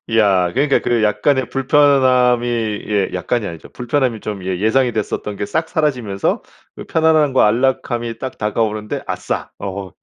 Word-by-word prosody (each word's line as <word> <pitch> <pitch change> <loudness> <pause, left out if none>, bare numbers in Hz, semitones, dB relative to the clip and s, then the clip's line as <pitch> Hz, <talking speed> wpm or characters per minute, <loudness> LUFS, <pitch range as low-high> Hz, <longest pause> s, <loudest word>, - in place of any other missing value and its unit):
야 95 -5 +3
그러니까 140 +2 +2
그 120 -2 +1
약간의 120 +5 +1
불편함이 130 -3 +3 0.4
예 105 -2 0
약간이 100 +4 -1
아니죠. 85 -1 -9
불편함이 125 -2 -1
좀 100 -3 -6
예 95 -1 -2
예상이 120 +3 +2
됐었던 105 -1 -3
게 100 - -3
싹 160 +1 -1
사라지면서 125 - -1 0.3
그 - - -8
편안함과 155 -7 +3
안락함이 120 -1 -1
딱 130 -1 -6
다가오는데 105 0 -2
'아싸!' - - -3
어허 95 -2 -6
120 Hz, 345 characters per minute, -18 LUFS, 105-130 Hz, 0.4 s, 야